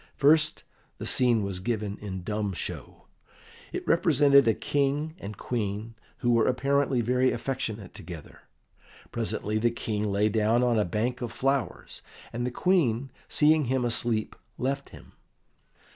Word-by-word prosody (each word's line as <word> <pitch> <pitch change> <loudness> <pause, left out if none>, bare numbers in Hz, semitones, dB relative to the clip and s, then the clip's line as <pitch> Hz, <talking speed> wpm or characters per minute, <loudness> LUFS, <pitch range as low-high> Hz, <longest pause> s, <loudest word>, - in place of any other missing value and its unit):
First 150 +1 +3 0.3
the - - -6
scene 120 -4 +3
was 95 -2 -3
given 105 0 -3
in 95 -3 -6
dumb 105 0 -2
show. - - -6 0.7
It - - -5
represented 145 -5 +5
a 110 - +4
King 145 +2 0
and 100 0 -7
Queen 110 -1 -3 0.3
who 120 - +2
were 115 -1 +3
apparently 135 0 +1
very 125 +2 +2
affectionate 115 -5 -4
together. 85 -3 -10 0.7
Presently 105 +1 -1
the 120 +2 +3
King 105 -2 -2
lay 100 +2 +2
down 110 +3 +2
on 120 -3 +2
a 105 - +2
bank 120 +7 -2
of 120 -2 -3
flowers, 135 0 -2 0.3
and 120 +1 -2
the - - 0
Queen, 135 -5 +1 0.2
seeing 155 0 +4
him 130 0 0
asleep, 115 -2 +1 0.2
left 135 +2 -2
him. - - -14
120 Hz, 145 wpm, -27 LUFS, 105-135 Hz, 0.7 s, represented